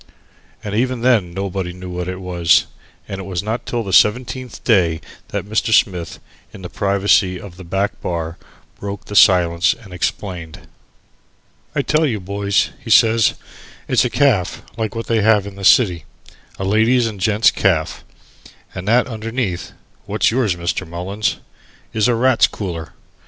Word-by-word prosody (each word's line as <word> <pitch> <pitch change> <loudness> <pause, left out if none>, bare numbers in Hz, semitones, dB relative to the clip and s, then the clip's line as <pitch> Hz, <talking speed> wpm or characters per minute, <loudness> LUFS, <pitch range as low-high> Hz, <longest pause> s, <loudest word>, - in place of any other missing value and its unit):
And 105 - -5
even 125 +2 0
then 115 -8 +2
nobody 95 -1 -4
knew 90 0 -9
what 90 0 -4
it 95 0 -5
was, 85 -2 +2 0.4
and 95 - -6
it - - -7
was 90 -1 -4
not 110 +3 -4
till 120 -1 -2
the 95 -3 -5
seventeenth 125 +3 +1
day 85 -8 +2 0.3
that - - -4
Mr. 110 +2 -1
Smith, 90 -7 +1 0.3
in 95 - -12
the 90 - -7
privacy 100 -1 +2
of 95 -4 -11
the 95 - -11
back 95 +4 -2
bar, 85 -1 -4 0.4
broke 100 0 -6
the 105 - -8
silence 85 -3 +4
and 100 -6 -13
explained. 90 -3 -4 1.1
"I 140 - +1
tell 155 +2 +2
you, 110 -6 -2
boys," 100 +1 0
he - - -8
says, 115 -1 +5 0.5
"it's - - +3
a - - 0
caff 120 -11 +1
like 110 -2 -3
what 115 - -4
they 115 -2 +1
have 105 -2 +3
in 100 -1 -8
the 100 - -9
city 95 -4 +4 0.5
a - - -4
ladies' 110 +5 +3
and 110 -3 -4
gent's 105 +2 +3
caff, - - 0 0.7
and 90 +2 -7
that 120 +3 +4
underneath 115 -4 -4 0.4
(what's - - +1
yours, 115 -7 +1
Mr. 85 -1 -3
Mullins?) 95 +6 -2 0.6
is 110 0 +2
a 120 - +2
Rats' 125 0 +4
Cooler. 85 -6 -6
100 Hz, 160 wpm, -19 LUFS, 90-115 Hz, 1.1 s, says